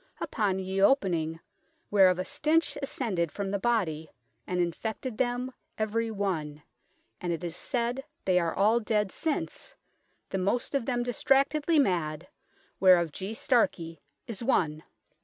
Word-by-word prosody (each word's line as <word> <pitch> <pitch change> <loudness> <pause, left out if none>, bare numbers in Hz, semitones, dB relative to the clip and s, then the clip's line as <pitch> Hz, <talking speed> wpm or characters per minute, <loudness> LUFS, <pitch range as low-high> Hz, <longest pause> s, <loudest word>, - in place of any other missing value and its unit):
upon 200 -4 0
ye 190 +1 -2
opening 175 - +2 0.5
whereof 190 -3 +6
a 185 - -2
stinch 310 +5 +1
ascended 195 - -2
from 200 -1 -3
the 200 - -1
body, 175 -9 0 0.4
and 180 0 -1
infected 215 +7 -3
them 250 0 0 0.3
every 225 +1 0
one, 165 -8 -3 0.6
and 175 - -2
it 170 +1 -3
is 170 -1 -4
said 245 +5 -2 0.2
they 185 -1 +4
are 170 -1 -1
all 215 +4 +4
dead 210 -3 0
since, 315 -3 -3 0.6
the 190 - -1
most 200 +9 0
of 275 -4 0
them 245 -2 0
distractedly 275 +6 +2
madd, 170 - +1 0.5
whereof 180 -4 +5
G. 195 +7 -5
Starkey 170 - 0 0.2
is 230 0 -6
one. 155 - +1
200 Hz, 140 wpm, -29 LUFS, 175-245 Hz, 0.6 s, whereof